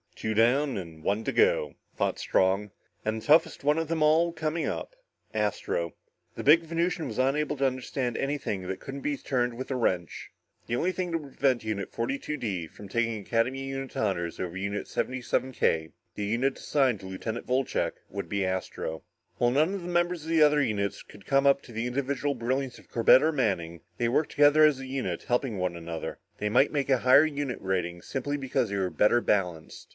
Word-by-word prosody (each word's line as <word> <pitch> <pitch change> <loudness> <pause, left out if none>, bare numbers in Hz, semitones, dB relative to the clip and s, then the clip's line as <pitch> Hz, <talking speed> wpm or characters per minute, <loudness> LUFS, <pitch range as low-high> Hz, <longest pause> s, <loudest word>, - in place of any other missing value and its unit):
"Two 110 - -2
down 125 +5 +3
and 80 -4 -8
one 100 +5 0
to - - -1
go," 475 +2 +3 0.2
thought - - -1
Strong, 95 +2 +1 0.3
and 110 +1 -2
the - - -13
toughest 160 0 +4
one 150 +3 +3
of 165 - -2
them 160 -1 0
all 160 +3 +4
coming 160 0 -2
up. - - -4 0.4
Astro. 105 -6 -1 0.4
The - - -5
big 155 +4 +7
Venusian 165 0 -1
was 110 - -6
unable 145 +3 +1
to 135 - +1
understand 130 -1 -2
anything 135 -10 -2
that 95 0 -4
couldn't 135 +1 -7
be 145 0 -1
turned 125 -3 -1
with 130 +3 -6
a - - 0
wrench. 90 -9 -1 0.4
The 120 - -1
only 180 +9 +1
thing 185 -1 -3
that 165 - +1
would 140 -4 -12
prevent 130 -4 +2
Unit 110 -2 -3
42 140 +5 -3
D 95 - -3
from 100 - -12
taking 115 +1 0
Academy 120 +6 0
unit 135 0 -5
honors 85 -5 -1
over 90 -1 -4
Unit 100 +2 -3
77 130 0 -2
K, 80 -8 +1 0.2
the 105 - -3
unit 120 +6 0
assigned 130 -7 +1
to 95 - -9
Lieutenant 110 +5 -5
Wolcheck, 130 +1 0 0.2
would 100 0 -5
be 100 -2 0
Astro. 95 -3 -3 0.3
While 120 0 +3
none 155 +8 +2
of 200 - -4
the 175 - -7
members 175 -1 0
of 160 - -7
the 165 -2 +5
other 150 0 +5
units 105 -6 -1
could 100 -2 -15
come 140 0 +3
up 140 0 +4
to - - -13
the 115 +1 -2
individual 140 +2 -1
brilliance 130 +1 -2
of - - -18
Corbett 120 +4 +6
or 160 - +3
Manning, 90 - -1 0.2
they 120 - +1
worked 150 +5 +1
together 145 +1 +5
as 150 -3 +3
a 135 - -7
unit, 135 0 -3
helping 120 -3 0
one 90 -1 -1
another. 85 -1 -6 0.2
They 105 - -1
might 125 +6 +4
make 140 -2 -1
a 130 - +4
higher 130 +5 +6
unit 145 -4 -3
rating, 90 -2 -2
simply 140 +2 -3
because 130 -4 -1
they 100 - -2
were 95 -2 0
better 115 +3 +4
balanced. 90 -8 -1
125 Hz, 205 wpm, -28 LUFS, 100-145 Hz, 0.4 s, big